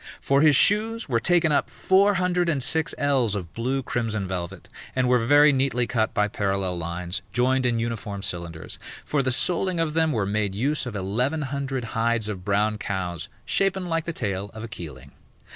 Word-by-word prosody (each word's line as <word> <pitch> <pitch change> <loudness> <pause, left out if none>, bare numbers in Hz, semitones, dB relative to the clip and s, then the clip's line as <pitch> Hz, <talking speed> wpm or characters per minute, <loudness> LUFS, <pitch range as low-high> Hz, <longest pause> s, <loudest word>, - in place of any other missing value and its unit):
For 140 +1 +2
his 150 -2 +6
shoes 220 - +3
were 120 -5 +1
taken 175 +3 +3
up 145 - +1
four 200 +2 +3
hundred 180 -1 +1
and 140 -6 0
six 160 +3 +1
ells 135 -7 +1
of 90 -5 -6
blue 130 +4 -1
crimson 110 -5 -2
velvet, 90 0 -5 0.3
and 130 -1 +2
were 125 0 +4
very 145 +5 +5
neatly 130 -2 +1
cut 110 -2 0
by 105 0 +1
parallel 95 -3 -2
lines, 85 +2 -4
joined 125 +3 +2
in 120 -1 +1
uniform 110 -4 -4
cylinders. 85 -4 -5 0.3
For 145 - +1
the 130 - 0
soling 175 +6 +1
of 160 -2 0
them 160 -1 +2
were 110 -6 0
made 100 -1 -1
use 135 +5 0
of 115 - -6
eleven 125 +11 -1
hundred 135 -2 -3
hides 115 -1 -1
of 95 -4 -5
brown 105 +2 +1
cows, 90 -5 -4 0.2
shapen 195 -1 +1
like 165 -2 -1
the 170 - -2
tail 100 -6 -3
of 110 - -7
a - - -5
keeling. 75 - -9
120 Hz, 190 wpm, -24 LUFS, 100-150 Hz, 0.3 s, his